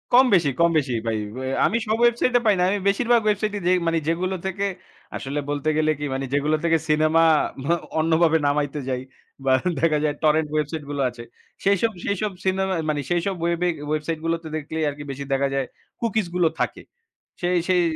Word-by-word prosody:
কম 260 Hz, +1 st, +8 dB
বেশি, 165 Hz, -6 st, +4 dB
কম 170 Hz, 0 st, +5 dB
বেশি 135 Hz, -4 st, 0 dB
ভাই। 110 Hz, -1 st, 0 dB, 0.5 s
আমি 230 Hz, -, +2 dB
সব 220 Hz, +1 st, +1 dB
ওয়েবসাইটে 240 Hz, +1 st, +3 dB
পাই 210 Hz, -, +5 dB
না। -, -, +3 dB
আমি 205 Hz, +1 st, 0 dB
বেশিরভাগ 235 Hz, +3 st, +3 dB
ওয়েবসাইটে 210 Hz, 0 st, 0 dB
যে -, -, +4 dB, 0.2 s
মানে 165 Hz, 0 st, +2 dB
যেগুলো 185 Hz, +3 st, 0 dB
থেকে 195 Hz, +1 st, -1 dB, 0.5 s
আসলে 140 Hz, +2 st, -3 dB
বলতে 145 Hz, +1 st, -1 dB
গেলে 155 Hz, 0 st, +3 dB
কি 145 Hz, -, -3 dB
মানে 135 Hz, 0 st, -2 dB
যেগুলো 150 Hz, +2 st, +2 dB
থেকে 165 Hz, -1 st, +3 dB
সিনেমা 155 Hz, +2 st, +3 dB, 0.8 s
অন্যভাবে 160 Hz, 0 st, +3 dB
নামাইতে 145 Hz, 0 st, 0 dB
যাই 125 Hz, -1 st, -1 dB, 0.4 s
বা 130 Hz, -, +3 dB, 0.3 s
দেখা 155 Hz, -2 st, +3 dB
যায় 150 Hz, -1 st, +1 dB
টরেন্ট 155 Hz, 0 st, +3 dB
ওয়েবসাইটগুলো 145 Hz, -2 st, -2 dB
আছে 120 Hz, -1 st, -10 dB, 0.4 s
সেইসব 200 Hz, +3 st, +2 dB
সেইসব 200 Hz, +1 st, -1 dB
সিনেমা 190 Hz, 0 st, +1 dB, 0.2 s
মানে 145 Hz, -1 st, 0 dB
সেইসব 175 Hz, +2 st, 0 dB
ওয়েবে 170 Hz, +1 st, +1 dB, 0.2 s
ওয়েবসাইট 155 Hz, +1 st, -2 dB
গুলোতে 165 Hz, -1 st, -1 dB
দেখলেই 155 Hz, +1 st, -3 dB
আরকি 145 Hz, +1 st, -7 dB
বেশি 140 Hz, +1 st, -6 dB
দেখা 140 Hz, +1 st, +2 dB
যায় 135 Hz, -1 st, 0 dB, 0.4 s
কুকিজগুলো 180 Hz, -7 st, +1 dB
থাকে। -, -, -2 dB, 0.6 s
সেই 180 Hz, +1 st, +1 dB
সেই 180 Hz, -1 st, +4 dB
165 Hz, 170 wpm, -23 LUFS, 150-190 Hz, 0.8 s, কম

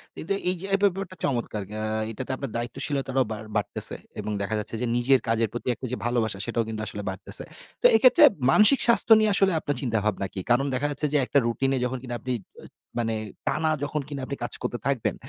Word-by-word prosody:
কিন্তু 195 Hz, +5 st, -3 dB, 0.2 s
এই 185 Hz, -, +1 dB
যে, 195 Hz, -, -7 dB
এই -, -, +5 dB
ব্যাপারটা 190 Hz, -1 st, 0 dB
চমৎকার। 120 Hz, -6 st, -1 dB, 0.2 s
আ -, -, -3 dB, 0.3 s
এইটাতে 130 Hz, +4 st, -5 dB
আপনার 135 Hz, -3 st, -5 dB
দায়িত্বশীলতাটাও 130 Hz, +2 st, -1 dB
বাড় 110 Hz, 0 st, -5 dB
বাড়তেছে। 105 Hz, -, +1 dB, 0.2 s
এবং 105 Hz, 0 st, -3 dB
দেখা 110 Hz, +2 st, -1 dB
যাচ্ছে 105 Hz, -, -5 dB
যে, -, -, +1 dB
নিজের 130 Hz, +2 st, +4 dB
কাজের 115 Hz, -1 st, +1 dB
প্রতি 120 Hz, -, -6 dB
একটা 130 Hz, -, -8 dB
যে 125 Hz, -, -2 dB
ভালোবাসা, 115 Hz, -4 st, 0 dB
সেটাও 120 Hz, 0 st, 0 dB
কিন্তু 110 Hz, -1 st, -4 dB
আসলে 105 Hz, -, -5 dB
বাড়তেছে। 95 Hz, -, -1 dB, 0.4 s
তো -, -, -2 dB
এইক্ষেত্রে 255 Hz, +7 st, +6 dB, 0.3 s
মানসিক 215 Hz, -, +6 dB
স্বাস্থ্য 235 Hz, -1 st, +4 dB
নিয়ে 215 Hz, -1 st, +3 dB
আসলে 195 Hz, -1 st, +3 dB
আপনার 145 Hz, -, -2 dB
চিন্তাভাবনা 105 Hz, -5 st, -1 dB
কি? -, -, -5 dB
কারণ 130 Hz, +3 st, +4 dB
দেখা 140 Hz, +3 st, 0 dB
যাচ্ছে 150 Hz, +2 st, -1 dB
যে, 150 Hz, -, +4 dB
একটা 140 Hz, -, +1 dB
রুটিনে 135 Hz, +3 st, 0 dB
যখন 130 Hz, +1 st, -2 dB
কিনা 120 Hz, -, -6 dB
আপনি, 130 Hz, -1 st, -3 dB, 0.3 s
অ্যা -, -, -12 dB, 0.3 s
মানে 115 Hz, -1 st, 0 dB, 0.3 s
টানা 155 Hz, +3 st, +1 dB
যখন 150 Hz, +1 st, -2 dB
কিনা 140 Hz, -2 st, -5 dB
আপনি 140 Hz, -, -4 dB
কাজ -, -, -4 dB
করতে 120 Hz, -, -3 dB
থাকবেন, 135 Hz, -5 st, 0 dB
130 Hz, 210 wpm, -25 LUFS, 115-145 Hz, 0.4 s, এইক্ষেত্রে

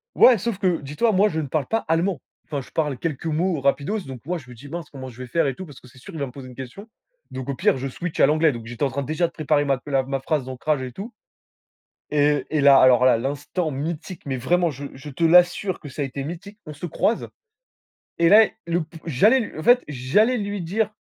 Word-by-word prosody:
Ouais, 250 Hz, -3 st, +7 dB
sauf 210 Hz, 0 st, -3 dB
que, 180 Hz, -4 st, +1 dB
dis-toi, 150 Hz, +12 st, 0 dB
moi, 205 Hz, +1 st, +4 dB
je 160 Hz, -5 st, -2 dB
ne 145 Hz, -, -4 dB
parle 150 Hz, +1 st, -1 dB
pas 225 Hz, -, +1 dB
allemand. 165 Hz, 0 st, +1 dB, 0.3 s
Enfin, 145 Hz, -2 st, -3 dB
je 130 Hz, -, -12 dB
parle 150 Hz, -4 st, -1 dB
quelques 160 Hz, -1 st, -4 dB
mots 165 Hz, +1 st, 0 dB
rapidos, 140 Hz, +10 st, 0 dB
donc 130 Hz, -2 st, -8 dB
moi, 175 Hz, +1 st, -2 dB
je 130 Hz, -6 st, -15 dB
me 125 Hz, -, -11 dB
dis: 130 Hz, +5 st, -12 dB
«Mince, 165 Hz, 0 st, -6 dB
comment 130 Hz, -2 st, -8 dB
je 125 Hz, 0 st, -13 dB
vais 130 Hz, -, -5 dB
faire 165 Hz, +6 st, +1 dB
et 135 Hz, -, -2 dB
tout 185 Hz, -, -7 dB
parce 145 Hz, -4 st, -13 dB
que 125 Hz, -, -16 dB
c'est 130 Hz, +1 st, -18 dB
sûr, 175 Hz, +8 st, -12 dB
il 160 Hz, -, -6 dB
va 140 Hz, -, -1 dB
me 125 Hz, -, -9 dB
poser 130 Hz, +1 st, -10 dB
une 125 Hz, -, -12 dB
question», 130 Hz, -, -9 dB, 0.4 s
donc 130 Hz, 0 st, -6 dB
au 140 Hz, -, -1 dB
pire, -, -, +2 dB
je 135 Hz, +1 st, -3 dB
switch 175 Hz, +5 st, -5 dB
à -, -, +7 dB
l'anglais, 155 Hz, +1 st, +3 dB
donc 120 Hz, -2 st, -7 dB
j'étais 120 Hz, +3 st, -3 dB
en 135 Hz, -, 0 dB
train, 140 Hz, +2 st, -3 dB
déjà, 155 Hz, +5 st, 0 dB
de 165 Hz, -, -12 dB
préparer 150 Hz, -2 st, +1 dB
ma 135 Hz, -2 st, 0 dB
la 135 Hz, -2 st, +1 dB
ma 135 Hz, +1 st, -3 dB
phrase 145 Hz, 0 st, -1 dB
d'ancrage 130 Hz, +2 st, -2 dB
et 130 Hz, -1 st, -6 dB
tout 205 Hz, -, -8 dB, 1.0 s
et 145 Hz, -2 st, +2 dB
et 155 Hz, -, +1 dB
là, 140 Hz, -1 st, +7 dB
alors 125 Hz, -1 st, +6 dB
là, 130 Hz, -2 st, +5 dB
l'instant 145 Hz, +6 st, -3 dB
mythique, 155 Hz, +5 st, -5 dB
mais 135 Hz, -2 st, -2 dB
vraiment 170 Hz, +7 st, +1 dB
je 140 Hz, 0 st, -7 dB
je 140 Hz, +3 st, -9 dB
te 155 Hz, +5 st, -2 dB
l'assure 180 Hz, +2 st, +4 dB
que 145 Hz, -, -9 dB
ça 145 Hz, +2 st, -5 dB
a -, -, 0 dB
été 135 Hz, +1 st, -5 dB
mythique. 190 Hz, +7 st, -8 dB
On 155 Hz, -, -7 dB
se 155 Hz, +5 st, -6 dB
croise 215 Hz, +7 st, 0 dB, 0.9 s
et 170 Hz, -, +4 dB
là 215 Hz, +4 st, +8 dB
et, -, -, -6 dB
le 170 Hz, +1 st, 0 dB
p 165 Hz, +1 st, -13 dB
j'allais 205 Hz, -, +4 dB
l 225 Hz, -, -6 dB
en -, -, -4 dB
fait, 245 Hz, +7 st, +5 dB
j'allais 150 Hz, -, +2 dB
lui 205 Hz, -1 st, -3 dB
dire 205 Hz, +6 st, -1 dB
150 Hz, 260 wpm, -23 LUFS, 135-175 Hz, 1.0 s, là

